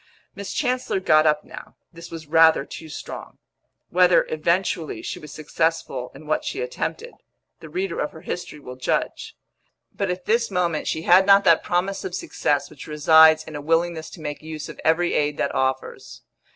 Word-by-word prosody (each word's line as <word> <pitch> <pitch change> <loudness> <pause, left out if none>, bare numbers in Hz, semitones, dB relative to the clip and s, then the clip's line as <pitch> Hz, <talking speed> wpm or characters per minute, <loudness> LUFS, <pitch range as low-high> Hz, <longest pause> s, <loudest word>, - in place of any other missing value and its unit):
Miss 200 -1 -7
Chancellor 255 -7 -1
got 155 -4 +4
up 150 0 +2
now; - - -12 0.2
this 170 0 -11
was 165 -1 -8
rather 160 -1 +5
too 160 - -10
strong. - - -8 0.5
Whether, 180 0 +4
eventually, 170 +1 -1
she - - -5
was 150 -1 -11
successful 155 -4 -2
in 155 - -12
what 155 - -1
she - - -4
attempted, 480 0 -4 0.5
the - - -11
reader 380 +2 -3
of - - -2
her - - -12
history 150 - -6
will 125 -3 -10
judge; 130 - -2 0.6
but 200 -2 -2
at 180 0 -4
this 230 +1 +1
moment 175 -5 -1
she 160 - -2
had 185 +3 +5
not 200 0 +7
that 165 -3 +5
promise 185 +3 -1
of 385 - -4
success - - -1
which - - -11
resides 155 +1 +6
in 155 -1 -10
a 145 - -5
willingness 165 +1 0
to 170 - -12
make 150 -1 -5
use 155 -1 -7
of - - -10
every 170 +2 +2
aid 150 0 0
that - - -1
offers. 130 0 -3
165 Hz, 180 wpm, -23 LUFS, 155-185 Hz, 0.6 s, not